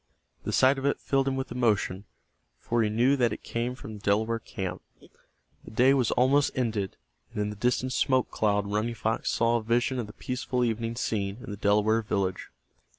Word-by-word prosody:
The - - -1
sight 135 +1 +4
of 135 - -5
it 140 - 0
filled 135 -1 +1
him 135 - 0
with 130 -2 -4
emotion, 105 -5 0 0.5
for 120 0 0
he 110 - +2
knew 120 +6 +3
that 120 -3 +2
it - - -6
came 120 +2 -2
from 110 -4 -9
the 105 - -9
Delaware 110 +3 +1
camp. 95 -4 -5 0.8
The - - -11
day 125 +5 +4
was 130 -5 +2
almost 135 +3 +3
ended, 110 -6 -1 0.3
and - - -5
in 105 0 -1
the - - -7
distant 125 +4 0
smoke 130 -1 +2
cloud 105 -1 +1
Running 105 +3 -1
Fox 110 +1 -1
saw 115 0 +2
a - - -3
vision 120 +3 +1
of 115 - -3
the 105 - -11
peaceful 125 0 -2
evening 115 0 -2
scene 100 -4 -2
in - - -7
the - - -4
Delaware 105 +2 +2
village. 100 -3 -2
115 Hz, 200 wpm, -28 LUFS, 105-125 Hz, 0.8 s, sight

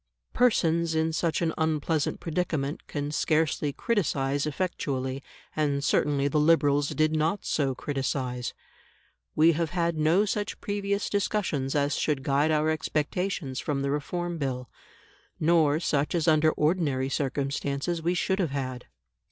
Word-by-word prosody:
Persons 170 -9 +2
in 160 0 +1
such 165 +1 0
an 160 - 0
unpleasant 160 -1 0
predicament 160 -4 -2
can 145 0 -3
scarcely 155 -1 +1
criticise 145 - 0
effectually, 140 -5 -2 0.3
and 145 -2 0
certainly 145 -2 +2
the 150 +2 +1
Liberals 145 -2 +3
did 155 0 +1
not 160 +6 0
so 135 -4 0
criticise. 130 -3 -3 0.8
We 160 +2 +6
have 165 0 -1
had 170 -2 -1
no 165 +7 +3
such 205 0 -3
previous 200 0 -2
discussions 185 -10 -1
as 145 -1 +1
should 145 -4 0
guide 145 +1 +2
our 155 0 +2
expectations 155 -2 -2
from 140 -2 -2
the 140 - 0
Reform 175 +4 -3
Bill, 125 -4 -3 0.7
nor 155 -2 +3
such 150 -1 0
as 165 -2 0
under 155 0 +5
ordinary 150 -5 +1
circumstances 140 +4 -2
we 175 +2 0
should 190 +2 0
have 175 -5 +1
had. 130 -2 -4
155 Hz, 135 wpm, -27 LUFS, 140-170 Hz, 0.8 s, We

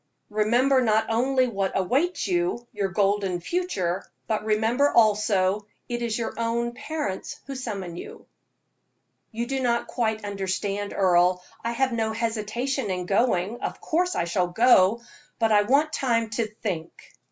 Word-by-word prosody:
Remember 240 +6 +3
not 220 -2 +2
only 255 +3 +2
what 195 -4 -2
awaits 275 - 0
you 350 -9 0
your 200 -2 -1
golden 195 -1 +1
future 190 - -2 0.2
but 215 -1 -1
remember, 225 +6 +2
also, 210 -2 +3 0.2
it 240 0 -3
is 230 -2 -1
your 230 - -3
own 235 +1 0
parents 270 -8 -4
who 275 - -6
summon 200 -9 -5
you." - - -9 1.1
"You 230 +2 -3
do 270 +2 -2
not 235 -2 +1
quite 220 -3 -2
understand, 200 +1 -2
Earle. 180 -1 +3 0.2
I 230 +1 -1
have 260 +2 +1
no 220 -1 0
hesitation 230 +2 -2
in 180 -1 -2
going. 205 +2 +1
Of - - -4
course 360 +3 0
I - - +1
shall 175 +1 0
go, 225 +1 +4 0.4
but 225 -1 +2
I 210 -1 +6
want 285 +8 +2
time 230 -4 0
to 225 0 -1
think." 195 -6 -6
220 Hz, 150 wpm, -25 LUFS, 195-245 Hz, 1.1 s, I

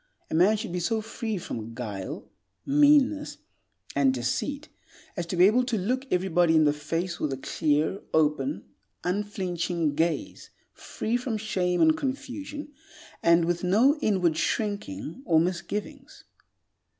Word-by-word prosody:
A - - -3
man 185 +7 +4
should 215 -3 -5
be 180 - -2
so 220 +6 0
free 220 0 -4
from 115 -9 -6
guile, 105 -6 -6 0.4
meanness, 290 0 +3 0.6
and 140 -1 +4
deceit 130 - -2 0.5
as 175 -4 -3
to 180 - -3
be 180 +1 +6
able 230 +6 +4
to 240 -3 -1
look 255 +8 -1
everybody 175 -2 +2
in 155 - +6
the 145 - +3
face 165 +4 -3
with 150 - -1
a 135 - -3
clear, 155 +6 0
open, 155 - +1 0.4
unflinching 180 -4 -1
gaze, 165 +2 -2 0.2
free 230 +3 -3
from 245 -3 -3
shame 185 -4 0
and 315 -1 +5
confusion, 290 +1 -5 0.5
and 170 0 +4
with 175 +1 -1
no 235 - +4
inward 180 - +2
shrinking 200 - -2
or 165 - +4
misgivings. 205 - -4
180 Hz, 140 wpm, -27 LUFS, 160-240 Hz, 0.6 s, be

